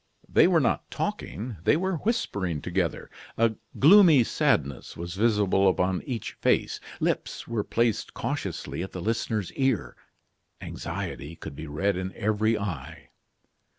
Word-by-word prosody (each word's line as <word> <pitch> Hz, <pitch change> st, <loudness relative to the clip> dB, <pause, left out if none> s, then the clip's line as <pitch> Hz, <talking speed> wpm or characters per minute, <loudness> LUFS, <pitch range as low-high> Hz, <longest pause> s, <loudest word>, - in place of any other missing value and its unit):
They -, -, +5 dB
were -, -, +4 dB
not -, -, 0 dB
talking, 115 Hz, 0 st, -4 dB
they 150 Hz, -, +4 dB
were 190 Hz, 0 st, -1 dB
whispering 105 Hz, -, -1 dB
together. -, -, -2 dB, 0.3 s
A 115 Hz, -1 st, +3 dB, 0.2 s
gloomy 165 Hz, -, +7 dB
sadness 70 Hz, -, 0 dB
was 85 Hz, +1 st, -5 dB
visible 100 Hz, -2 st, +3 dB
upon 90 Hz, 0 st, 0 dB
each 120 Hz, -5 st, -3 dB
face; -, -, +1 dB, 0.2 s
lips -, -, -2 dB
were 115 Hz, -3 st, -1 dB
placed 115 Hz, 0 st, 0 dB
cautiously -, -, -3 dB
at 95 Hz, -, -6 dB
the 90 Hz, -, -5 dB
listener's 110 Hz, -1 st, -1 dB
ear; 130 Hz, -6 st, 0 dB, 0.6 s
anxiety 75 Hz, +4 st, -5 dB
could 70 Hz, -, -9 dB
be 80 Hz, +2 st, -7 dB
read 90 Hz, +6 st, 0 dB
in 95 Hz, +1 st, -4 dB
every 110 Hz, +2 st, +1 dB
eye. 90 Hz, -11 st, -6 dB
105 Hz, 135 wpm, -27 LUFS, 90-120 Hz, 0.6 s, gloomy